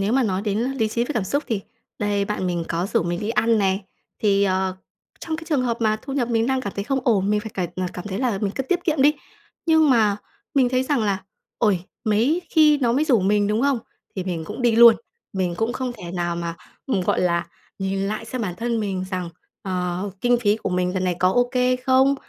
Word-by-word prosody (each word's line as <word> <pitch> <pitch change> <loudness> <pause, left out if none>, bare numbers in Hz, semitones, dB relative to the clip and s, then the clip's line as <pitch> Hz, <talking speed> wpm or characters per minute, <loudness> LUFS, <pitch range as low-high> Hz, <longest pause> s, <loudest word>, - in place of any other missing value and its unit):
nếu 200 +4 0
mà 270 - +3
nói 195 -4 -1
đến 205 -1 -1
lý 245 -1 0
trí 235 +2 0
với 300 - -4
cảm 215 -5 0
xúc 285 +9 0
thì 220 -5 -1 0.4
đây, 205 -1 0
bạn 205 -2 -2
mình 175 -2 -1
có 170 +3 -1
rủ - - +1
mình 175 +1 -2
đi 210 - -3
ăn 225 0 +2
này. 195 0 +1 0.4
Thì, 200 -2 +3
ờ, 190 -1 0 0.4
trong 320 -1 -3
cái 325 - -9
trường 285 -5 +2
hợp 235 -2 0
mà 215 -1 +2
thu 275 - -6
nhập 250 -4 0
mình 230 -1 +1
đang 265 0 +1
cảm 200 -6 -5
thấy 200 - -2
không 270 +3 0
ổn, 205 -4 +2
mình 210 - +2
phải 220 +1 -7
cải 180 -3 -1
ờ, 185 - -2
cảm 180 - -7
thấy 190 +1 -3
là 240 -6 0
mình 200 0 -1
cứ 270 - -1
tiết 350 +6 -1
kiệm 305 -5 +2
đi. 295 +2 +5 0.5
Nhưng 320 -2 +5
mà 215 -5 +4 0.4
mình 260 -3 +4
thấy 255 0 +1
rằng 275 -1 0
là 195 -2 0 0.4
"Ôi, 190 -5 +2 0.2
mấy 240 +12 +2
khi 305 -2 +5
nó 240 -4 +2
mới 290 +5 +2
rủ 250 -8 +3
mình", 205 +2 +2
đúng 215 +4 +1
không? 280 -3 +2 0.4
Thì 185 - -2
mình 170 -4 -3
cũng 210 +9 -6
đi 235 -2 +3
luôn. 235 0 +9 0.4
Mình 185 -3 -1
cũng 225 +4 0
không 255 0 -3
thể 180 -7 -9
nào 175 -1 -1
mà, 170 -1 -4 0.3
ừm, 250 -8 +1
gọi 180 - +1
là, 170 -1 +1 0.3
nhìn 195 0 -1
lại 210 +3 -2
xem 240 +1 -4
bản 180 -4 -3
thân 235 -1 -1
mình 190 -3 -2
rằng, 185 -2 -3 0.3
ờ, 180 +1 -2
kinh 245 0 +3
phí 210 -2 +3
của 210 - -4
mình 180 0 0
lần 185 -1 0
này 180 -1 0
có 185 0 +3
ô 245 +2 +3
kê 250 0 +2
không, 260 +2 +3
215 Hz, 250 wpm, -23 LUFS, 190-250 Hz, 0.5 s, luôn